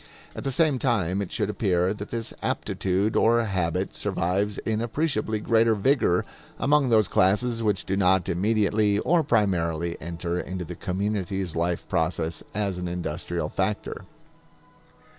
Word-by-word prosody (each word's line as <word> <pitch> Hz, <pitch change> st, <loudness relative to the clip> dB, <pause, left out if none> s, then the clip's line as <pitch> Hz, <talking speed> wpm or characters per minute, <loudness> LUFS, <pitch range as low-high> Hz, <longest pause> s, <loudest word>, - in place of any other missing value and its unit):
At -, -, -6 dB
the 135 Hz, -, -1 dB
same 150 Hz, -1 st, +2 dB
time 100 Hz, -5 st, +1 dB
it 100 Hz, -, -5 dB
should 105 Hz, -, -1 dB
appear 95 Hz, -2 st, +1 dB
that 105 Hz, -1 st, -8 dB
this 115 Hz, -1 st, -4 dB
aptitude 95 Hz, +3 st, -1 dB
or 115 Hz, 0 st, +4 dB
habit 90 Hz, -5 st, -1 dB
survives 100 Hz, +4 st, -1 dB
in 110 Hz, 0 st, -2 dB
appreciably 115 Hz, -3 st, -1 dB
greater 115 Hz, +1 st, +3 dB
vigor 105 Hz, -5 st, +2 dB, 0.3 s
among 145 Hz, -2 st, +3 dB
those 110 Hz, -4 st, +4 dB
classes 115 Hz, +7 st, +2 dB
which 105 Hz, -4 st, 0 dB
do 95 Hz, -, -1 dB
not 95 Hz, -2 st, +3 dB
immediately 105 Hz, +2 st, +2 dB
or 165 Hz, +9 st, +2 dB
primarily 85 Hz, -, 0 dB
enter 85 Hz, +1 st, -3 dB
into 90 Hz, -1 st, -5 dB
the 90 Hz, -, -7 dB
community's 95 Hz, -1 st, -2 dB
life 85 Hz, +1 st, -1 dB
process 80 Hz, -2 st, -1 dB
as 100 Hz, -3 st, -1 dB
an 90 Hz, -, -3 dB
industrial 90 Hz, 0 st, -3 dB
factor. -, -, -3 dB
100 Hz, 140 wpm, -25 LUFS, 90-110 Hz, 0.3 s, or